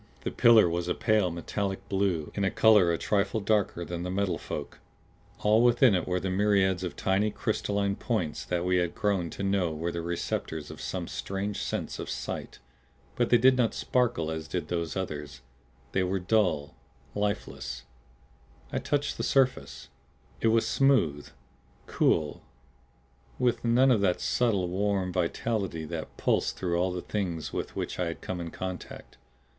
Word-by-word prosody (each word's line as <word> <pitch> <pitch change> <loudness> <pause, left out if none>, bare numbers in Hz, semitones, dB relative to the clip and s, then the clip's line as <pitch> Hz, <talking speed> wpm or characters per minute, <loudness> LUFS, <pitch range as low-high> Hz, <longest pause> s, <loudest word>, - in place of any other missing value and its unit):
The - - -3
pillar 115 -5 +6
was 85 +1 -2
a 90 - 0
pale 110 -4 +2
metallic 95 +3 -4
blue, 95 -6 0
in 100 -1 +1
color 105 -6 +5
a 85 - 0
trifle 100 +3 0
darker 100 -4 0
than 85 0 -5
the 90 - -3
Metal 95 0 -1
Folk. - - -6 0.6
All 110 +2 +4
within 120 -1 +5
it 90 -3 0
were 90 0 0
the 95 0 -2
myriads 95 -2 +2
of 90 - -4
tiny 100 +3 +1
crystalline 100 -3 -1
points 100 -10 -2
that 90 0 -1
we 90 0 +2
had 90 -1 0
grown 95 -5 0
to 100 - -6
know 95 -4 +1
were 80 +2 -3
the 85 - -3
receptors 80 -2 -3
of - - -10
some - - -4
strange 100 +1 -3
sense - - -3
of - - -5
sight. - - -5 0.6
But 120 -1 +1
they 120 - +6
did 130 +3 +5
not 120 -3 +1
sparkle 120 -11 0
as 80 0 -5
did 80 -1 -3
those 85 -2 -2
others; 75 -6 -5 0.5
they 95 - +1
were 95 +1 0
dull, 90 - +1 0.4
lifeless. 100 - -3 0.9
I - - +1
touched 145 -1 -1
the - - -2
surface. 135 -2 +1 0.5
It - - +1
was 115 0 +3
smooth, 85 - +2 0.6
cool 75 -2 +1 1.0
with 125 -2 +1
none 125 +3 +4
of 110 -5 +3
that 90 -3 +2
subtle, 105 -7 +1
warm 95 0 0
vitality 90 -1 -1
that 80 0 -6
pulsed - - +1
through 85 -2 0
all 95 0 +1
the 90 -1 -4
Things 90 -6 -3
with - - -4
which - - -4
I 90 - 0
had 85 - -5
come 90 -1 -4
in 85 - -5
contact. 95 -7 -7
95 Hz, 165 wpm, -28 LUFS, 85-105 Hz, 1.0 s, pillar